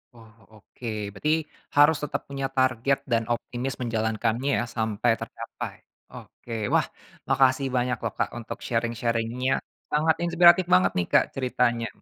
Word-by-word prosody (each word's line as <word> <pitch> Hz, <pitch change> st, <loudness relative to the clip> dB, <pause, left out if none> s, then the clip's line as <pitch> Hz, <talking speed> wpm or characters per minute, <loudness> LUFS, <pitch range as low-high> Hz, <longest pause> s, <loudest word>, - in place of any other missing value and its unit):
Oh, 110 Hz, -1 st, -16 dB, 0.2 s
oke. 110 Hz, +3 st, -11 dB, 0.3 s
Berarti 150 Hz, +10 st, 0 dB, 0.5 s
harus 145 Hz, +1 st, +6 dB
tetap 150 Hz, -, -2 dB
punya 135 Hz, -1 st, -4 dB
target 130 Hz, +1 st, +2 dB
dan 115 Hz, -1 st, +2 dB
optimis 125 Hz, +2 st, -4 dB
menjalankannya 115 Hz, +2 st, -1 dB
ya -, -, 0 dB
sampe 110 Hz, +1 st, -1 dB
tercapai. -, -, -7 dB, 0.4 s
Oke, 120 Hz, -, -12 dB, 0.2 s
wah -, -, +5 dB, 0.5 s
makasih 135 Hz, 0 st, +3 dB
banyak 125 Hz, 0 st, +1 dB
loh, 115 Hz, -, -1 dB
Kak, -, -, +1 dB
untuk 115 Hz, -, -6 dB
sharing-sharing-nya 115 Hz, +2 st, -1 dB, 0.4 s
sangat 155 Hz, +2 st, +3 dB
inspiratif 175 Hz, +1 st, +6 dB
banget 90 Hz, 0 st, +5 dB
nih, 90 Hz, -, 0 dB
Kak, -, -, +6 dB
ceritanya. 125 Hz, -2 st, 0 dB
120 Hz, 135 wpm, -26 LUFS, 115-135 Hz, 0.5 s, harus